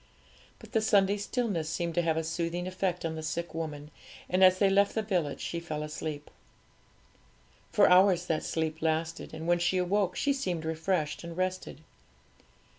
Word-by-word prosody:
But - - -15
the 225 -3 +2
Sunday 205 -2 +3
stillness 205 -7 -2
seemed 170 +1 -2
to 175 - +2
have 165 -1 0
a 160 - 0
soothing 170 +2 -2
effect 185 -1 -2
on 160 - -2
the 160 - -5
sick 170 +2 -4
woman; 150 -2 -5 0.4
and 185 +1 +2
as 185 0 +7
they 200 - +4
left 200 +1 +3
the 220 - 0
village 180 -8 -1
she 170 - -3
fell 155 -3 -4
asleep. 150 -1 -6 1.4
For - - +5
hours 180 -1 +5
that 160 -3 0
sleep 160 -1 -2
lasted, 160 +1 -1
and 160 +1 -7
when 175 0 +3
she 180 +2 +1
awoke 185 +1 +1
she 285 - +1
seemed 180 -12 -3
refreshed 160 -1 -1
and 170 0 -8
rested. 185 -4 -3
170 Hz, 175 wpm, -29 LUFS, 160-185 Hz, 1.4 s, as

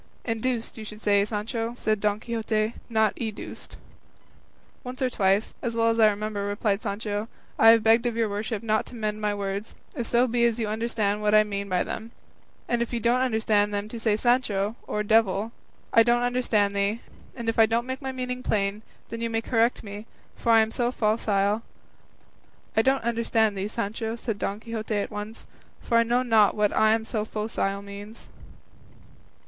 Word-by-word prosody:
"Induced, 230 0 -2
you - - -6
should 215 0 -9
say, 200 -1 +4
Sancho," 225 +2 -3
said 215 -3 0
Don 210 0 0
Quixote; 220 -1 -1 0.2
"not 220 -2 +2
educed." 220 -3 -6 1.1
"Once 250 0 -7
or 255 -1 0
twice, 195 0 +1
as 235 -2 -3
well 230 0 +3
as 230 0 0
I 215 -1 +7
remember," 210 0 -3
replied 205 0 0
Sancho, 205 +1 -3 0.3
"I 225 - +8
have 225 -1 +6
begged 225 +2 +4
of 235 - -2
your 230 -1 +1
worship 210 +2 -3
not 215 -1 0
to - - -9
mend 215 -1 -3
my 210 -1 0
words, 200 +1 -4 0.2
if 240 -5 -3
so 240 +1 +3
be 240 -1 +1
as 235 0 +1
you 220 - -1
understand 215 -1 -1
what 210 0 +3
I 215 - +7
mean 200 -1 -4
by 180 -1 +1
them; 225 +1 -6 0.5
and 240 -1 0
if 235 - -2
you 240 - -1
don't 235 +2 +2
understand 220 -4 +2
them 205 +1 -2
to 235 - -6
say 220 -2 +2
'Sancho,' 220 -3 +1
or 210 - -1
'devil,' 215 0 +2 0.4
'I 230 - +7
don't 240 +1 +3
understand 230 -5 +1
thee; 200 +3 0 0.3
and 235 -2 -6
if 225 - 0
I 220 - +7
don't 230 +2 0
make 260 +2 -5
my 265 -1 -3
meaning 250 -1 -4
plain, 205 -2 0 0.3
then 230 - -6
you 230 - -1
may 225 0 0
correct 230 +1 +1
me, 205 +1 -8 0.3
for 235 - 0
I 225 -1 +7
am 220 0 0
so 240 +1 0
focile 210 -2 +1 0.6
" - - -34
"I 220 - +5
don't 265 +2 +2
understand 225 -2 +1
thee, 195 +1 -2
Sancho," 225 +1 -3
said 225 -3 -4
Don 205 +1 -3
Quixote 225 -1 -4
at 205 - -2
once; 210 +2 -7 0.3
"for 230 - +2
I - - +6
know 240 +2 +1
not 220 -4 +4
what 210 -1 +1
'I 215 0 +4
am 220 0 -1
so 215 -1 -2
focile' 210 -2 -2
means." 205 +2 -10
220 Hz, 195 wpm, -26 LUFS, 210-230 Hz, 1.1 s, I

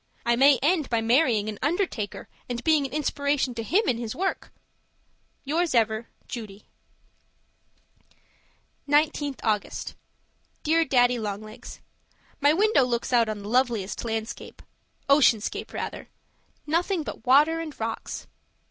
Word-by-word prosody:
I 235 0 +3
may 275 +2 +6
end 310 -2 +2
by 230 - +1
marrying 230 -2 +2
an 215 -1 -5
undertaker 290 - -2 0.2
and 245 0 -4
being 310 -4 +3
an - - -17
inspiration 285 -2 0
to 230 - -4
him 370 - +2
in 235 - +1
his 230 -2 -5
work. 380 +2 -3 0.9
Yours 320 +1 0
ever, 220 0 +1 0.2
Judy 215 -4 -8 2.3
19th 290 -2 +1
August 210 -2 -2 0.7
Dear 325 +2 +3
Daddy 245 -3 +3
Long 205 -2 -4
Legs, 215 0 -11 0.6
My 285 +1 +5
window 405 -2 +3
looks 245 0 -2
out 230 -2 +4
on 210 -1 -5
the - - -7
loveliest 235 -5 0
landscape 225 -1 -5 0.4
ocean 280 -5 +5
scape, 210 - -5
rather - - -6 0.6
nothing 335 +3 0
but - - -8
water 300 +5 +5
and 320 -3 -7
rocks. 225 0 -4
255 Hz, 130 wpm, -26 LUFS, 225-300 Hz, 2.3 s, may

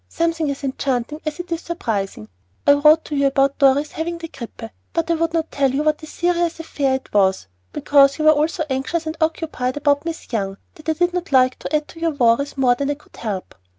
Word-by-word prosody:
Something 330 -2 0
as 280 +1 -4
enchanting 270 +1 -2
as 305 +1 -3
it 350 0 -7
is 335 0 -1
surprising! 205 - -3 0.4
I - - +7
wrote 305 +2 +4
you 280 -1 +2
about 275 +1 +1
Dorry's 280 +2 +4
having 340 +2 -3
the 330 -1 -7
grippe; 230 -3 -9 0.2
but 335 0 0
I - - +4
would 330 0 0
not 330 -1 -1
tell 275 -1 +2
you 280 +3 0
what 305 0 +1
a 310 - -9
serious 345 0 0
affair 280 -4 0
it 265 - -8
was, 190 -2 +2 0.3
because 275 - +4
you 310 - -1
were 310 - +8
all 305 0 +3
so 330 0 -3
anxious 275 +5 -2
and 315 0 -3
occupied 315 -5 -1
about 285 -1 +2
Miss 330 -6 -6
Young 195 -3 -2 0.2
that 310 0 -8
I - - +3
did 350 +3 +1
not 360 -3 -3
like 255 -1 +4
to - - -2
add 300 0 0
to 330 - -12
your 330 -2 -1
worries 260 +3 +2
more 255 -2 +4
than 275 +3 -2
I 290 - 0
could 300 - -22
help. 205 -5 -5
290 Hz, 230 wpm, -21 LUFS, 265-325 Hz, 0.4 s, were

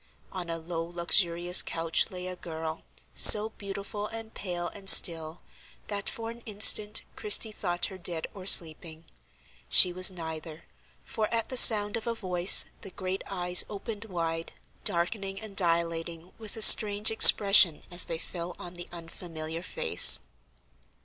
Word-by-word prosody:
On 180 -2 -9
a 165 - -6
low 165 0 -8
luxurious 175 +1 -1
couch 165 +4 -4
lay 180 -2 -11
a 185 0 -9
girl, 160 -2 -10 0.3
so 215 +1 +7
beautiful 200 0 -10
and 225 0 -13
pale 175 -3 -8
and 195 -1 -3
still, 165 -2 +3 0.5
that 200 -1 -7
for 230 0 -10
an 235 +1 -16
instant 210 0 +2
Christie 215 +1 0
thought 175 -4 -6
her 190 -1 -12
dead 170 -2 -4
or 190 -1 -11
sleeping. 160 -2 +2 0.6
She 180 - +3
was 185 +1 +3
neither, 160 -3 -11 0.4
for 215 -1 -7
at 230 -1 -5
the 255 - -8
sound 210 -3 +4
of 230 - -11
a 230 - -5
voice 180 -3 +3 0.2
the 195 - -11
great 185 +1 -8
eyes 180 -2 0
opened 210 +1 -11
wide, 165 -4 -8 0.3
darkening 195 +3 -4
and 215 -3 -13
dilating 170 -1 -4
with 220 0 -9
a 220 - -2
strange 210 0 +5
expression 195 -6 +5
as 175 +1 0
they 165 - -7
fell 170 +1 -10
on 175 - -12
the 175 0 -12
unfamiliar 165 -1 -10
face. - - +4
180 Hz, 150 wpm, -24 LUFS, 170-205 Hz, 0.6 s, so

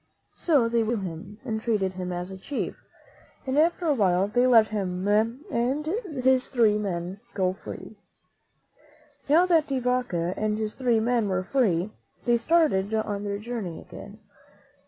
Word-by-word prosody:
So 285 -9 +2
they 230 0 +1
were 225 +2 0
good 205 - -4
to - - -2
him 195 +6 -11
and 220 -1 -2
treated 205 -5 0
him 180 -1 -5
as 180 +1 -4
a 190 - -7
chief, 280 +8 -4 0.7
and 260 0 -1
after 340 +3 +2
a 310 - +3
while 190 -5 +2
they 245 +4 +2
let 225 -3 +6
him 190 -3 -2
and 240 - 0 0.4
his 260 0 +3
three 220 -5 +3
men 185 -1 -4 0.2
go 185 -2 +1
free. 195 - -10 1.3
Now 330 +5 +6
that 330 -4 +3
De 275 - -1
Vaca 245 -9 0
and 215 0 -1
his 215 -1 -3
three 245 -4 +1
men 230 -2 +1
were 185 -1 0
free, 195 -5 +1 0.3
they 240 -1 +4
started 235 - +2
on 210 -2 -2
their 200 -1 -2
journey 215 -6 -5
again. - - -11
220 Hz, 165 wpm, -26 LUFS, 190-250 Hz, 1.3 s, let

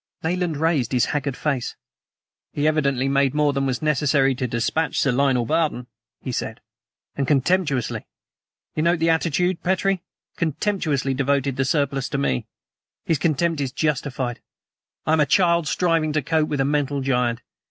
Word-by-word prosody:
Nayland 175 -1 -1
raised 150 -6 +1
his 125 - +3
haggard 140 -2 -2
face. 140 -6 -2 0.8
"He 145 +1 +1
evidently 140 -4 +1
made 135 0 +2
more 150 -1 +2
than 135 0 0
was 130 +2 -2
necessary 140 -2 +2
to 130 0 -2
dispatch 120 +7 -1
Sir 135 - +2
Lionel 130 -2 +2
Barton," 155 -3 0 0.3
he 130 - -5
said; 115 -1 -4 0.6
"and 140 -2 -1
contemptuously 145 -2 +1 0.7
you 155 - 0
note 170 +2 +3
the 165 0 +2
attitude, 170 +2 0
Petrie? 190 0 +1 0.4
contemptuously 155 -5 0
devoted 140 0 0
the 135 0 0
surplus 140 -2 0
to - - -2
me. 65 - -1 0.6
His 160 -4 +1
contempt 165 0 +1
is 135 -2 -2
justified. 130 -5 -2 0.6
I 155 - +2
am 160 - +3
a 150 - +3
child 170 -4 +3
striving 165 -2 +1
to 155 -2 0
cope 155 +1 +1
with 145 -2 0
a - - +2
mental 145 -1 0
giant. 125 -3 0
145 Hz, 160 wpm, -23 LUFS, 135-160 Hz, 0.8 s, his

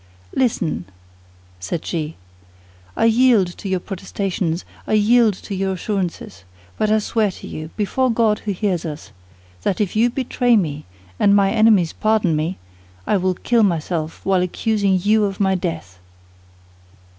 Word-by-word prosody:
"Listen," 185 - 0 0.7
said 95 - -4
she; 160 -2 -3 0.8
"I - - +3
yield 225 -6 +4
to 200 - -6
your 190 -1 0
protestations, 190 -2 -3 0.2
I - - -1
yield 215 0 +4
to 200 - -8
your 190 0 -1
assurances. 180 - -4 0.3
But 215 - 0
I 215 - +4
swear 215 0 0
to 185 - -10
you, 155 0 -7
before 255 +5 +1
God 225 -2 +2
who 210 - -3
hears 185 -3 -1
us, 155 -2 -7 0.5
that 185 - -1
if 205 -2 -1
you 230 +3 +4
betray 245 -1 +1
me, 150 -6 -2 0.3
and 200 0 +5
my 195 -1 +4
enemies 215 -7 +4
pardon 215 -6 +1
me, 160 +5 -2 0.5
I 210 - +2
will 185 0 0
kill 235 +5 +1
myself, 165 -4 -1
while 190 -2 +3
accusing 200 +1 +1
you 210 +3 +3
of 195 -1 -4
my 190 -1 +2
death." 160 - -4
195 Hz, 150 wpm, -20 LUFS, 175-215 Hz, 0.8 s, and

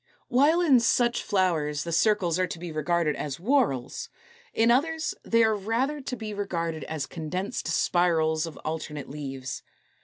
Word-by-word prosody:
While 295 +7 +4
in 285 -8 +5
such 240 +1 +2
flowers 165 -7 0
the 170 - -5
circles 185 -1 +2
are 185 - +2
to 175 - -6
be 170 0 -6
regarded 155 0 0
as 145 -3 -4
whorls, 200 - 0 0.4
in 230 +1 +3
others 315 +5 +1
they 230 0 +3
are 220 -1 +3
rather 235 +9 -1
to 260 -1 -4
be 215 -2 -6
regarded 170 -6 -3
as 155 -3 -3
condensed 180 +7 -4
spirals 165 -1 +2
of 160 - -9
alternate 150 -3 -4
leaves. 135 -3 -5
180 Hz, 155 wpm, -27 LUFS, 155-230 Hz, 0.4 s, in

